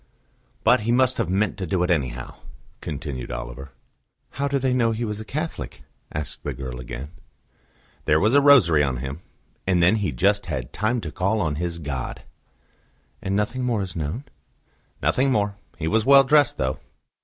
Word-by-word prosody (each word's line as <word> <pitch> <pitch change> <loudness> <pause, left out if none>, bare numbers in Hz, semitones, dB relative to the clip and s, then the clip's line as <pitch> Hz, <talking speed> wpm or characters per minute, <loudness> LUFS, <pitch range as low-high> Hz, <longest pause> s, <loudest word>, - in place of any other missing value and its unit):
"But - - +5
he 110 +2 -1
must 130 +1 +3
have 110 -7 0
meant 100 +2 +1
to 95 - -3
do 90 +2 +1
it 90 - +1
anyhow," 65 -6 -1 0.5
continued 70 -4 -5
Oliver. 65 +3 -6 0.6
"How 140 +2 -1
do 140 0 +1
they 130 -1 +1
know 115 -3 +2
he 115 +2 -2
was 105 -1 -4
a - - -5
Catholic?" 155 +8 -5 0.3
asked 75 0 -4
the - - -3
girl 65 -2 -6
again. 65 +4 -7 0.9
"There 75 - +4
was 110 +6 +3
a 145 - +6
rosary 120 - +6
on 65 -3 0
him; 70 +5 -6 0.5
and 90 -2 +3
then 95 +6 +5
he 105 -3 -1
just 100 +1 +1
had 65 -3 -4
time 115 +3 0
to 75 - -5
call 100 +5 0
on 75 -7 -1
his 85 0 -2
God." 70 -6 -5 1.0
"And 95 +1 -1
nothing 105 +5 -1
more 115 -5 0
is 90 -4 -6
known?" 80 - -3 0.8
"Nothing 135 +1 +2
more. 105 -4 +1 0.2
He 80 - -3
was 110 +6 +2
well 140 +2 +8
dressed, 145 0 +4
though." 65 0 -1
95 Hz, 180 wpm, -24 LUFS, 75-120 Hz, 1.0 s, well